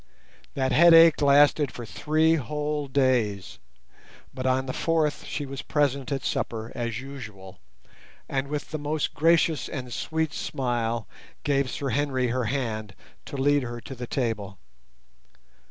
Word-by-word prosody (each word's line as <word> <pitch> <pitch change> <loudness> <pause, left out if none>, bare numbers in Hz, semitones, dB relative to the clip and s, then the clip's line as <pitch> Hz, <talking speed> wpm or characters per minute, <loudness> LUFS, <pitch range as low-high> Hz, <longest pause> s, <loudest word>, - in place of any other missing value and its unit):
That 130 -1 0
headache 165 +3 +7
lasted 145 -1 +5
for 120 - -8
three 155 +7 +2
whole 150 +1 -2
days; 125 -8 0 0.7
but 130 0 -3
on 130 +1 +1
the 130 - -4
fourth 160 -3 0
she 145 - -4
was 135 0 -6
present 140 -2 0
at 135 -2 -2
supper 110 -1 -2
as 115 -1 -3
usual, 110 -9 -10 0.7
and 135 0 -2
with 150 +1 -5
the 155 - -3
most 150 +1 -2
gracious 165 0 +2
and 125 -4 -6
sweet 160 -1 -2
smile 120 -3 -2 0.4
gave 140 -3 +1
Sir 140 +1 -3
Henry 130 -1 0
her 125 0 -1
hand 110 -5 -3 0.3
to 140 - -7
lead 145 +2 +3
her 120 -1 -5
to 135 - -8
the 125 -1 -7
table. 110 -7 -2
135 Hz, 140 wpm, -26 LUFS, 120-145 Hz, 0.7 s, headache